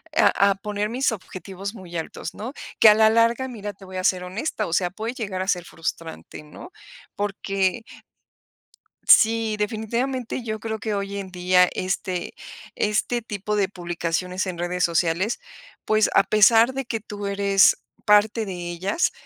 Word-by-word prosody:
a 200 0 +4
a - - 0
poner 210 +1 -3
mis 255 +3 +1
objetivos 195 -1 -7
muy 175 -4 -8
altos, 165 0 -6
¿no? 235 +6 -6 0.3
Que 220 - +9
a - - +8
la 220 0 +5
larga, 230 +3 +2
mira, 210 -5 -6
te 195 0 -15
voy 185 0 -8
a 185 - -3
ser 185 -1 +2
honesta, 215 +4 -3
o 165 - -5
sea, 180 0 +2
puede 220 +4 -5
llegar 200 -7 -4
a 190 - -3
ser 180 -3 0
frustrante, 165 -1 -6
¿no? 150 - -12 0.4
Porque 195 +1 -1 1.2
sí, 225 -1 +5
definitivamente 235 +4 -2
yo 215 -1 -4
creo 220 0 -4
que 220 -1 -3
hoy 200 0 -3
en 195 -1 -6
día 180 0 +4
este, 185 -1 -3 0.4
este 215 +3 0
tipo 210 -1 -3
de 200 -2 +2
publicaciones 175 0 -3
en 185 -2 -5
redes 180 +1 -1
sociales, 170 - +1 0.5
pues, 215 0 +3
a 195 - +5
pesar 225 +4 +5
de 270 0 -4
que 230 -1 -3
tú 205 -1 -8
eres 200 -1 +4 0.3
parte 210 +2 +4
de 195 - -5 0.2
ellas 190 - 0
200 Hz, 165 wpm, -23 LUFS, 185-220 Hz, 1.2 s, Que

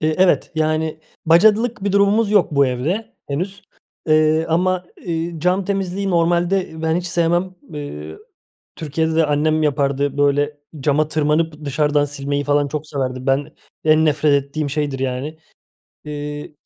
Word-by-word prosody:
Iıı, 155 0 +1
evet, 185 -1 +3
yani, 155 0 -1 0.3
bacalık 215 +6 +4
bir 200 - 0
durumumuz 200 +2 +3
yok 205 -6 +3
bu 140 -1 +4
evde 150 - -2
henüz, 180 +8 -3 0.4
eee, 155 +1 +3
ama, 180 +2 +1 0.2
ııı, 165 0 -2
cam 180 +3 +1
temizliği 195 0 -2
normalde, 175 +2 +1
ııı, 160 0 -9
ben 160 +1 +1
hiç 180 0 -3
sevmem. 175 +2 0 0.2
Iıı, 80 - -7 0.6
Türkiye'de 160 +1 -1
de 160 -1 +3
annem 155 +2 +1
yapardı, 140 -1 0
böyle 145 +1 +1 0.2
cama 150 +2 +1
tırmanıp 155 0 0
dışarıdan 145 +1 +1
silmeyi 145 0 -3
falan 145 0 +2
çok 150 +2 -4
severdi. 130 -3 -3
Ben, 140 +3 0 0.3
en 155 0 +4
nefret 145 -2 +2
ettiğim 145 0 -4
şeydir, 145 -2 -2
yani. 135 +4 -3 0.7
Iıı, 150 0 -6
155 Hz, 145 wpm, -20 LUFS, 145-175 Hz, 0.7 s, bacalık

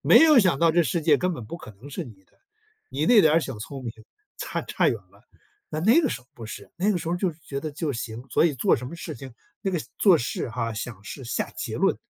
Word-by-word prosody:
没 - - +7
有 310 -4 +8
想 185 - +4
到 165 +1 +5
这 170 +2 +4
世 155 +5 0
界 150 -2 +5
根 180 +4 0
本 120 - -7
不 110 - -7
可 130 -10 -11
能 120 +9 -13
是 165 +5 -4
你 105 -7 -14
的， - - -36 0.6
你 145 +4 -1
那 230 +1 +8
点 160 -2 +5
小 135 -8 -5
聪 135 +5 -7
明 115 - -4 0.4
差 - - -3
差 - - +1
远 - - +1
了， - - -21 0.5
那 155 - -3
那 225 - +6
个 295 - +1
时 125 - -4
候 125 - -26
不 115 - -9
是， - - -9
那 195 +4 +2
个 180 - 0
时 165 - -5
候 175 - +1
就 180 0 0
是 155 - -16
觉 140 - -5
得 155 +1 -5
就 150 0 -2
行， 115 0 -5
所 - - +4
以 165 -4 +2
做 125 - +3
什 125 - -6
么 140 - -7
事 165 -3 -6
情 130 0 -10 0.3
那 195 - 0
个 180 - 0 0.2
做 190 -5 +6
事 125 -1 -3
哈， 115 -1 -2
想 110 -2 -6
事、 135 +6 -7
下 120 - -2
结 - - -4
论 - - +2
150 Hz, 295 characters per minute, -25 LUFS, 120-175 Hz, 0.6 s, 有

